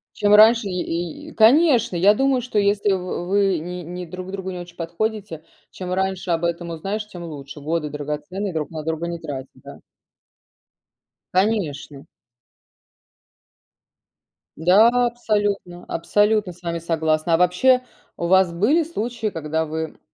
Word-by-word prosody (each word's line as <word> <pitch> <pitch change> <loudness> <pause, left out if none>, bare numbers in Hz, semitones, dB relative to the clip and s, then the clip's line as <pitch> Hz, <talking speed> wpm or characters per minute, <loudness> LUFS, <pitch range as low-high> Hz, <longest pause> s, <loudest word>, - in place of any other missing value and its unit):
Чем 205 -1 +2
раньше 220 +1 +7
е 180 -2 -2
и 170 -1 -5
и - - -12
конечно, 245 - +4
я 190 +4 +5
думаю, 265 +2 +1
что 240 -3 -4
если 205 0 +2
в 180 -2 -3
вы 195 -2 +2
ни 180 +2 -6
не 180 +2 -7
друг 185 +2 -7
другу 190 -1 -5
не 180 - -6
очень 175 0 -10
подходите, 175 0 -4 0.3
чем 180 -1 -5
раньше 190 -1 -1
об 165 0 0
этом 170 0 -2
узнаешь, 195 +6 -4
тем 180 -4 -9
лучше. 145 -3 -9
Годы 155 +1 -2
драгоценные 150 +7 -4
друг 155 -2 -3
на 155 -1 -6
друга 160 +1 -3
не 170 0 -5
тратить, 140 -5 -6
да. - - -11 1.6
Конечно. 165 -9 -1 2.5
Да, 185 +8 +6 0.2
абсолютно 205 -6 -2
абсолютно 205 +3 +1
с 175 +1 -18
вами 170 -1 -2
согласна. 160 0 +1
А - - +2
вообще, 180 +9 +4 0.4
у - - -3
вас 190 0 +4
были 215 - +2
случаи, 235 -7 -3
когда 160 -4 -2
вы 160 +1 -5
180 Hz, 145 wpm, -22 LUFS, 165-210 Hz, 2.5 s, раньше